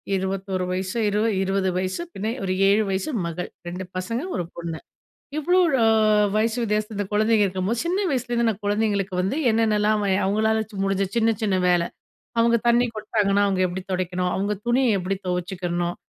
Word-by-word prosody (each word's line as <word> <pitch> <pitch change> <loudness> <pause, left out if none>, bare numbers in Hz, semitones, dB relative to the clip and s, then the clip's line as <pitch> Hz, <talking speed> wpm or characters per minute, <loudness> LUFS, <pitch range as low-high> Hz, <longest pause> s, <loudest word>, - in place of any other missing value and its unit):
21 190 -1 -2
வயசு, 185 +2 -3
இர் 205 - -1 0.3
20 195 0 0
வயசு 185 - -2
பின்ன 210 +3 -3
ஒரு 185 -1 0
7 205 +2 +4
வயசு 190 +7 -1 0.2
மகள். 170 +1 -4 0.2
2 180 +2 -5
பசங்க, 230 +7 -2
1 175 - -1
பொண்ணு. 170 -1 -5 0.6
இவ்ளோ, 355 +5 +3 0.2
அ 225 - +5 0.5
வயசு 220 +2 +1
வித்தியாசம், 215 0 -1
இந்த 205 0 -2
குழந்தைங்க 215 0 +3
இருக்கும்போது, 190 +4 -1
சின்ன 355 +2 0
வயசுலேருந்து 240 -3 0
நான் 215 -1 -4
குழந்தைங்களுக்கு 205 -2 0
வந்து 190 +7 -1 0.2
என்னென்னலாம் 215 -1 +2
வை 195 - +1
அவங்களால 220 +3 +2 0.2
முடிஞ்ச 195 0 +1
சின்ன 230 -1 +3
சின்ன 205 -3 +1
வேல. 175 -1 +3 0.6
அவங்க 235 0 +4
தண்ணி 240 +1 +4
கொட்டுனாங்கன்னா, 210 -2 +1
அவங்க 190 -1 0
எப்படி 180 +1 -5
துடைக்கணும்? 180 0 -1
அவங்க 200 +2 -1
துணிய 240 -2 +3
எப்படி 190 +2 -2
துவைச்சிக்கணும்? 175 -1 -2
200 Hz, 160 wpm, -23 LUFS, 185-220 Hz, 0.6 s, அ